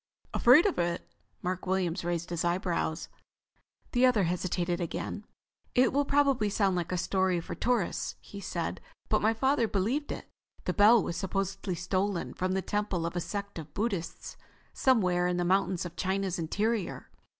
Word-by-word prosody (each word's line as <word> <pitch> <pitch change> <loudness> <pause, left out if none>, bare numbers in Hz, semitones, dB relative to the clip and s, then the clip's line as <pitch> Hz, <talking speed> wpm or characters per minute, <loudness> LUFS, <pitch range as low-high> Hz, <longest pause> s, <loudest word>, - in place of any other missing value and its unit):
"Afraid 260 - +7
of 400 - +1
it?" 170 0 -1 0.4
Mark 185 0 -3
Williams 185 -1 0
raised 175 0 -2
his 170 -1 -1
eyebrows. 175 -2 -1 0.8
The 245 0 +2
other 250 -6 +5
hesitated 175 0 -1
again. 175 +5 -4 0.5
"It 255 0 +4
will 285 +1 +2
probably 275 -6 +3
sound 195 -2 +2
like 175 -1 -2
a 180 - 0
story 185 0 +1
for 165 - -6
tourists," 240 -7 -1
he 200 - -10
said. 175 -3 -3 0.3
"But 215 - +3
my 220 +2 +3
father 265 0 +2
believed 225 +10 -1
it. - - -6 0.4
This - - -1
bell 215 +2 +7
was 170 - -3
supposedly 195 0 -2
stolen 185 +1 -1
from 185 +1 -1
the 190 0 0
temple 205 -5 -1
of 170 - -3
a 175 - 0
sect 200 -1 -5
of 155 -1 -10
Buddhists 195 -6 -3 0.4
somewhere 180 -9 +3
in 180 0 0
the 175 - 0
mountains 185 -1 +1
of 175 -1 -7
China's 190 -1 -1
interior. 205 +5 -2
190 Hz, 165 wpm, -30 LUFS, 175-215 Hz, 0.8 s, Afraid